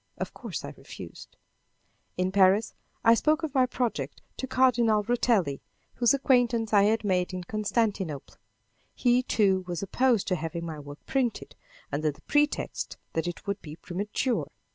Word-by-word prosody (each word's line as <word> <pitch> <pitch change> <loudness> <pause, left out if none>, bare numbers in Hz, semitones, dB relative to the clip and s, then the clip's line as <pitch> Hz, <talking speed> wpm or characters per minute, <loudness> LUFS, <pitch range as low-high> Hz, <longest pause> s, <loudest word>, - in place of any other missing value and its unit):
Of - - -4
course, - - -6
I - - -7
refused. - - -11 0.8
In 185 +1 0
Paris 195 +2 +4 0.3
I 230 0 +7
spoke 305 +7 +2
of 305 -4 -3
my 260 -2 +4
project 245 -2 -3
to 260 - -4
Cardinal 240 -5 +3
Rotelli, 215 - +1 0.3
whose 245 +3 +3
acquaintance 245 -5 +2
I 200 -1 +6
had 220 +1 +2
made 185 -2 0
in 180 - -4
Constantinople. 205 - -2 0.6
He, 245 0 +3
too, 195 -6 +2
was 175 0 -3
opposed 240 +1 +2
to 185 - +2
having 165 +1 -4
my 160 -2 -6
work 145 0 -11
printed, 240 - -1 0.4
under 150 +2 0
the 145 - -9
pretext 295 0 0 0.2
that 165 +2 -1
it 175 - -6
would 200 0 -3
be 150 -1 -9
premature. 205 +9 -2
210 Hz, 155 wpm, -28 LUFS, 180-245 Hz, 0.8 s, I